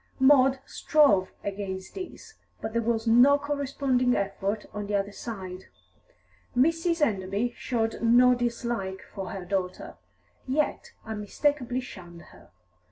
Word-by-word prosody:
Maud 265 0 +5
strove 205 -12 +3
against 195 -2 -5
this, 395 +4 -8 0.3
but 220 - -5
there 235 - +1
was 225 0 -1
no 245 +5 +6
corresponding 275 -3 0
effort 200 +1 -2
on 210 -1 -4
the 205 - -1
other 200 0 -1
side; 190 -4 -7 0.9
Mrs. 330 +4 +2
Enderby 200 +3 -2
showed 225 -3 -2
no 245 +2 +6
dislike 235 -6 -2
for 195 -2 -5
her 190 -2 -6
daughter, 185 -1 -3 0.5
yet 295 +4 -1
unmistakably 245 +4 -1
shunned 175 -8 -11
her. - - -18
230 Hz, 120 wpm, -27 LUFS, 195-265 Hz, 0.9 s, no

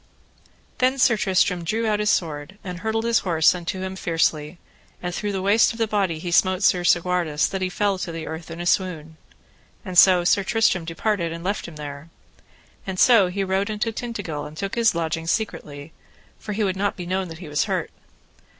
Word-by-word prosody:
Then 260 +1 +2
Sir 245 -3 +4
Tristram 185 -3 +1
drew 220 +7 -1
out 210 -1 +1
his 210 0 +1
sword, 160 +1 -2
and 180 -3 -6
hurtled 220 +3 -1
his 235 -1 +3
horse 165 -4 +3
unto 180 +1 -5
him 190 0 -4
fiercely, 165 -2 -1 0.4
and 180 0 -4
through 205 +3 -2
the 190 -1 -3
waist 205 +4 +4
of - - -10
the 225 - +1
body 200 -6 0
he 175 +2 -5
smote 185 +2 +3
Sir 180 -2 +3
Segwarides 175 -4 +2
that 195 - -4
he 185 - 0
fell 200 0 0
to 175 - -4
the 165 -1 -6
earth 160 +1 -7
in 165 +1 -8
a 175 - -4
swoon. 160 -4 -1 0.7
And 185 -2 -6
so 180 0 +7
Sir 195 +3 +3
Tristram 190 -4 +1
departed 170 +1 -1
and 165 0 -7
left 200 +3 -2
him 170 - -11
there. 145 +1 -8 0.8
And 185 -1 -4
so 230 -7 +6
he 195 +2 -2
rode 190 +2 0
unto 215 +2 -2
Tintagil 205 - -5
and 150 +1 -13
took 195 +2 -4
his 230 -5 +2
lodging 165 0 -2
secretly, 155 -7 -3 0.5
for 210 - -5
he 215 +1 -1
would 190 -2 0
not 200 +1 -1
be 180 - -6
known 185 +1 -2
that 165 -1 -9
he 170 -1 -10
was 150 0 0
hurt. - - -2
185 Hz, 205 wpm, -23 LUFS, 165-205 Hz, 0.8 s, so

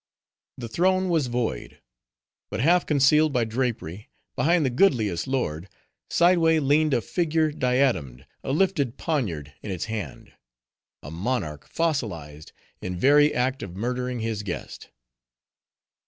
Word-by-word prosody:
The 120 - -6
throne 185 +8 +1
was 160 -6 +1
void. 120 - -3 0.7
But - - -4
half 170 +7 +3
concealed 150 +2 +4
by 125 -3 +1
drapery, 110 -5 -3 0.3
behind 160 +5 +2
the 130 - 0
goodliest 115 - +2
lord, 95 - -2 0.4
sideway 170 -2 +4
leaned 150 0 +2
a - - +1
figure 160 +1 0
diademed, 125 - 0 0.2
a - - -3
lifted 150 -6 +1
poniard 85 - -2
in - - -7
its 95 -3 -3
hand:—a 60 - -10
monarch 85 - -3
fossilized 90 - -3 0.3
in 90 -1 -4
very 145 +7 +5
act 130 +2 -1
of 90 -3 -7
murdering 125 +3 -3
his 110 -2 -2
guest. 100 -4 -7
125 Hz, 125 wpm, -25 LUFS, 95-150 Hz, 0.7 s, very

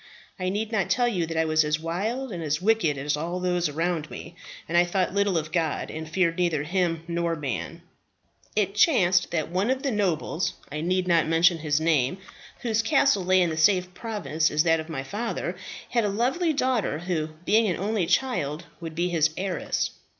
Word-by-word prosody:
I 185 0 -1
need 210 +3 -2
not 205 -5 0
tell 245 -1 +2
you 180 -8 -1
that 165 0 -4
I 160 - +2
was 155 0 +3
as 150 0 0
wild 215 +11 -3
and 175 -3 -5
as 150 -1 -1
wicked 190 -7 +2
as 145 +2 -1
all 170 +4 -3
those 180 -2 0
around 165 +1 -2
me; 170 - -9 0.3
that 170 - -3
I 175 - +6
thought 180 +1 -1
little 200 -3 +2
of 155 -1 -3
God, 165 -4 -1
and 160 0 -6
feared 170 0 +1
neither 165 -5 +1
Him 170 -1 0
nor 170 -1 -1
man. 140 -5 -5 0.7
"It 200 -2 +1
chanced 190 - +4
that 165 -1 -2
one 190 +6 0
of 265 0 0
the 275 - 0
nobles 185 -5 -1 0.2
I 150 +1 -3
need 180 +2 0
not 170 -3 +3
mention 165 +1 +4
his 150 -1 +1
name 155 -1 +1 0.5
whose 225 -2 +1
castle 270 -4 +3
lay 185 0 +4
in 170 - 0
the 160 - -4
same 180 +3 +4
province 180 -4 -2
as 150 +1 +2
that 165 -1 +3
of 160 +1 -7
my 135 -5 -4
father, 215 - -3 0.4
had 235 -2 +2
a 205 - +1
lovely 260 - +1
daughter, 255 - 0
who, 165 -2 -2 0.2
being 220 +3 +4
an 180 - 0
only 200 -2 -1
child, 170 - 0 0.2
would 165 -2 -7
be 175 +2 0
his 160 -2 +2
heiress. 185 -1 -2
175 Hz, 200 wpm, -26 LUFS, 160-205 Hz, 0.7 s, I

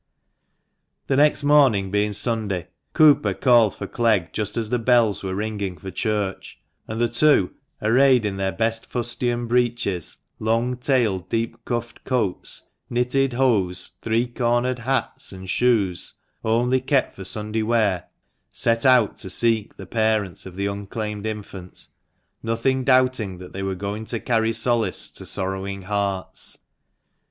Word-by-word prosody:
The 135 - 0
next 145 +1 +4
morning 135 -10 +4
being 105 +1 +1
Sunday, 105 -4 -1 0.2
Cooper 150 -2 +5
called 120 -5 +4
for - - -6
Clegg 110 -7 +1
just 105 +1 -3
as 110 -2 -2
the 125 - +1
bells 115 -3 +3
were 95 -1 -3
ringing 100 -3 -3
for 95 +5 -8
church; 105 0 -3 0.3
and 110 +1 -4
the 120 - +3
two, 120 -5 +3 0.3
arrayed 125 +1 +4
in 100 -2 -2
their 95 0 0
best 115 +1 -1
fustian 120 0 -2
breeches, 120 -7 0 0.2
long 115 +3 0
tailed, 115 -9 0
deep 115 0 -2
cuffed 120 -1 -4
coats, 115 -8 -2 0.2
knitted 125 +2 +1
hose, 100 -8 +1
three 115 +1 +1
cornered 120 +1 0
hats, 130 +3 -1
and 95 -1 -9
shoes, 110 -8 +1 0.3
only 120 +3 +2
kept 135 0 +1
for 95 - -9
Sunday 105 +3 -2
wear, 110 -5 +1 0.5
set 115 +2 +1
out 125 -5 +4
to 95 - -4
seek 115 +1 +1
the 95 - -8
parents 110 -3 -1
of 90 - -11
the 100 +1 -2
unclaimed 105 +1 -4
infant, 100 -4 -7 0.6
nothing 115 +4 0
doubting 130 -7 +2
that 90 0 -11
they 95 - -5
were 95 -1 -2
going 100 +3 -4
to 115 0 -3
carry 115 -1 +1
solace 115 -4 0
to - - -8
sorrowing 95 0 -3
hearts. 100 -1 -2
110 Hz, 145 wpm, -23 LUFS, 100-120 Hz, 0.6 s, Cooper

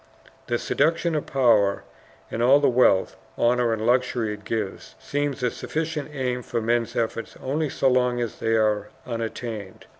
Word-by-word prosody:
The - - +1
seductions 165 0 +1
of 150 - -2
power, 115 -7 +3 0.5
and 115 - -2
all 130 +4 +6
the 145 - +3
wealth, 120 -7 +3 0.2
honor, 120 0 +2
and 110 -1 -1
luxury 120 -3 +1
it 105 0 -10
gives, 110 -4 -4
seem 145 0 -2
a 125 -2 -1
sufficient 155 -2 -3
aim 125 -3 -2
for 120 -1 -3
men's 115 +1 0
efforts 115 -1 -2
only 145 +3 -1
so 135 - 0
long 125 -1 +2
as 120 -3 -3
they 115 0 +1
are 105 -1 +1 0.2
unattained. 115 -3 -5
120 Hz, 160 wpm, -24 LUFS, 110-135 Hz, 0.5 s, all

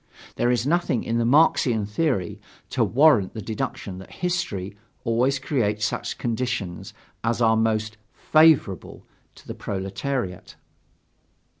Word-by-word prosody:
There 120 - +1
is 120 -1 +1
nothing 165 -6 +1
in 115 +1 -1
the 115 - +1
Marxian 125 -6 +3
theory 105 - -1 0.3
to - - +1
warrant 125 -7 +4
the - - -4
deduction 100 -3 -4
that 95 - -12
history 105 - -3 0.3
always 125 +4 +1
creates 115 -6 -1
such - - -3
conditions 120 -6 -3 0.3
as 115 +1 0
are 110 -2 +4
most 110 -1 0 0.2
"favorable" 155 - +3 0.3
to - - -17
the - - -5
proletariat. 95 +1 -4
115 Hz, 125 wpm, -24 LUFS, 105-135 Hz, 0.3 s, warrant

